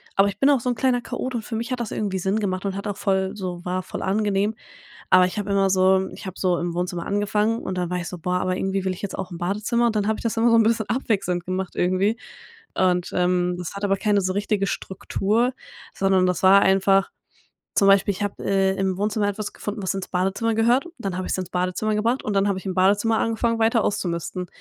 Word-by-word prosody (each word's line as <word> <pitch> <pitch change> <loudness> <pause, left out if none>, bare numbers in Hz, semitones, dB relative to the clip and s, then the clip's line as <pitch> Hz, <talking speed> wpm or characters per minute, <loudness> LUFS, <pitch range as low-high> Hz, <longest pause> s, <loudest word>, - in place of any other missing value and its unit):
aber 195 +1 +5
ich 200 0 -5
bin 275 - +4
auch 275 -3 +4
so 250 - -2
'n 245 - 0
kleiner 245 0 +1
Chaot 255 +1 -4
und 225 - -3
für 225 - -5
mich 235 +3 -4
hat 250 - -2
das 230 - -4
irgendwie 195 -3 -2
Sinn 195 +4 0
gemacht 185 -2 -2
und 195 -1 -2
hat 200 +2 -5
auch 205 -1 -3
voll 190 -1 0
so 180 -3 -5
war 185 +1 -2
voll - - -6
angenehm. 205 +1 0 0.6
Aber 185 0 +7
ich 195 +4 -5
habe 205 0 -3
immer 195 -1 +2
so 190 0 +3
ich 200 - -10
habe 190 - -7
so 180 -2 +1
im 175 -1 -3
Wohnzimmer 180 -1 -3
angefangen 210 +2 0
und 185 - -4
dann 180 -1 -2
war 180 - -1
ich 175 - -4
so: 180 - -7
„Boah, 180 +2 -2
aber 185 0 -1
irgendwie 190 0 -1
will 190 - 0
ich - - -12
jetzt 200 - -5
auch 185 - -5
ins 170 - -7
Badezimmer,“ 210 +6 0
und 220 -2 0
dann 205 -1 +1
hab 220 - 0
ich - - -8
das 230 -1 -2
immer 230 +1 +3
so 230 - +5
'n 225 - +6
bisschen 225 0 +1
abwechselnd 200 -8 -1
gemacht 185 0 -3
irgendwie. 190 +5 +1 0.6
Und, 180 -1 +1
ähm, 180 0 +1
das 180 +2 -6
hat 200 - -4
aber 195 0 +2
keine 205 0 +2
so 185 0 -1
richtige 205 -1 0
Struktur, 215 +7 -1 0.4
sondern 190 -1 +2
das 180 -2 -1
war 195 +1 +7
einfach 195 0 +3 0.7
zum 200 - +4
Beispiel 195 +1 +5
ich 200 +1 -4
hab, 205 - -4
äh, 195 -1 +1
im 190 -1 -1
Wohnzimmer 205 0 0
etwas 205 +1 -5
gefunden, 205 0 -5
was 190 - 0
ins 195 -1 -5
Badezimmer 195 +5 0
gehört 240 +8 +2
und 345 - -15
dann 195 -5 -3
habe 185 - -3
ich's - - -1
ins 185 -1 -5
Badezimmer 185 +4 -1
gebracht 230 +5 0
und 210 - -2
dann 195 0 +2
habe 195 -2 0
ich 190 - -9
im 190 - -2
Badezimmer 205 +4 +3
angefangen 230 0 0
weiter 225 0 +3
auszumisten. 180 -2 -2
195 Hz, 250 wpm, -23 LUFS, 185-215 Hz, 0.7 s, Aber